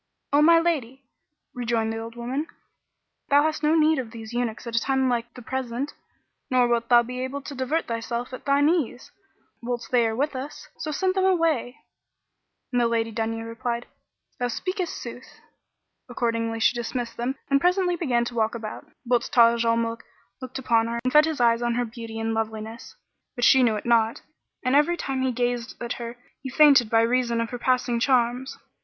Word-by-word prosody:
"O 290 - +5
my 335 +2 +7
lady, 275 -6 -1 0.5
rejoined 230 -2 -1
the 225 - -4
old 230 +1 -8
woman, 255 +6 -3 0.8
"thou 285 +1 +5
hast 310 -1 -1
no 305 +1 +3
need 315 -1 +4
of 245 -4 -4
these 225 0 -9
eunuchs 240 -1 -2
at 235 -1 -5
a - - +4
time 265 +1 +1
like 240 -1 -1
the 250 - -10
present; 260 +2 -3 0.6
nor 250 -1 +3
wilt 235 -1 0
thou 240 -1 +6
be 250 +2 -5
able 265 +2 -4
to 285 - -7
divert 270 +5 -1
thyself 235 +2 -4
at 255 - -8
thine 280 +1 +3
ease, 305 -7 -1 0.5
whilst 240 -1 -4
they 240 -2 +4
are 220 - -2
with 285 +3 -1
us; 270 +3 -7
so 310 - -4
send 370 +5 0
them 380 0 +1
away;" 325 -9 +1 0.9
and 245 -1 +2
the 235 - +3
Lady 225 -1 0
Dunya 225 0 -3
replied, 235 +1 -4 0.5
"Thou 245 - 0
speakest 370 - -3
sooth" 245 +1 -10 0.7
Accordingly 230 -2 -1
she 225 - +4
dismissed 240 0 -4
them 245 +3 -2 0.2
and 275 0 +4
presently 360 0 +2
began 250 -8 0
to 240 - -5
walk 225 -1 0
about, 225 +5 -7 0.2
whilst 240 -1 +1
Taj 235 -1 +5
al 230 0 +2
Muluk 230 0 -2 0.4
looked 255 0 -6
upon 230 -3 +2
her 235 0 -3
and 255 - -1
fed 300 +1 +7
his 315 -3 -3
eyes 235 -1 +3
on 240 -1 0
her 245 0 0
beauty 225 -1 -8
and 225 0 -1
loveliness 220 0 -5 0.4
(but 245 - -4
she 265 - +6
knew 230 -3 +3
it 210 - -5
not); 230 -1 +2 0.4
and 255 +2 +2
every 300 +4 +3
time 270 -4 -2
he 260 0 +1
gazed 245 0 -2
at 240 0 -3
her 235 0 -6 0.2
he 265 - -5
fainted 275 -4 +6
by 225 0 +4
reason 235 0 +1
of 230 -1 -2
her 245 - -5
passing 250 -1 +1
charms. 250 +1 +1
245 Hz, 195 wpm, -25 LUFS, 230-270 Hz, 0.9 s, my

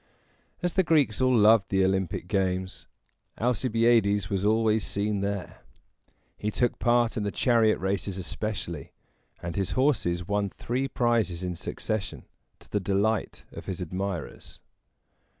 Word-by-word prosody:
As 175 - 0
the 190 - +4
Greeks 150 - +2
all 130 -1 +4
loved 110 -1 +5
the 95 -1 +3
Olympic 95 -2 -1
games, 95 -1 -1 0.5
Alcibiades 115 -4 +2
was 95 -1 0
always 110 0 +2
seen 100 0 -1
there. 100 -2 -4 0.8
He 105 - -1
took 120 +3 0
part 120 -1 +2
in - - 0
the 100 - 0
chariot 115 0 +3
races 95 0 -2
especially; 90 -5 -5 0.5
and 85 -1 -4
his 95 -1 -1
horses 100 - +1
won 100 -1 0
three 125 +7 -2
prizes 115 -9 0
in 90 -1 -3
succession, 105 +4 -4 0.4
to - - -18
the 105 - +1
delight 100 +3 0
of - - -10
his 95 -3 -4
admirers. 90 -1 -5
105 Hz, 135 wpm, -27 LUFS, 95-115 Hz, 0.8 s, loved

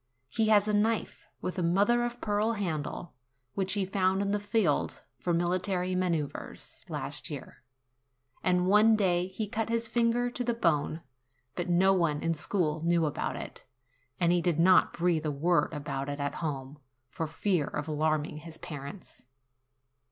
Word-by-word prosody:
He 220 -1 +2
has 210 -1 +5
a 210 - +1
knife, 215 +2 0
with 185 +1 -3
a - - +1
mother 200 +8 +3
of 240 0 -3
pearl 210 +1 +1
handle, 170 -4 -3 0.4
which 190 -1 0
he 200 -2 0
found 190 0 +1
in 200 - -1
the 205 - +1
field 205 -1 0 0.2
for 175 - -1
military 180 +2 0
manoeuvres, 170 -5 -3
last - - -3
year, - - -8 0.8
and 180 -1 +2
one 210 +3 +6
day 180 -4 +2
he 200 +3 -4
cut 220 +2 -2
his 230 0 +2
finger 240 +1 +1
to 245 - -2
the 240 -1 0
bone; 160 -5 +1 0.5
but 175 0 -3
no 190 +3 +4
one 170 -5 +1
in 165 - +1
school 155 -1 0
knew 170 -1 +3
about 150 - -2
it, - - -7 0.6
and 170 -1 +3
he 175 0 +3
did 170 -2 0
not 185 +2 +5
breathe 170 -2 +1
a - - +1
word 165 +5 +1
about 145 -2 -4
it 145 +1 -4
at 140 0 -2
home, 145 -2 -4 0.3
for 160 +5 -4
fear 165 -1 0
of 150 - -4
alarming 155 0 0
his 160 +1 -9
parents. 150 +4 -8
180 Hz, 165 wpm, -29 LUFS, 160-205 Hz, 0.8 s, one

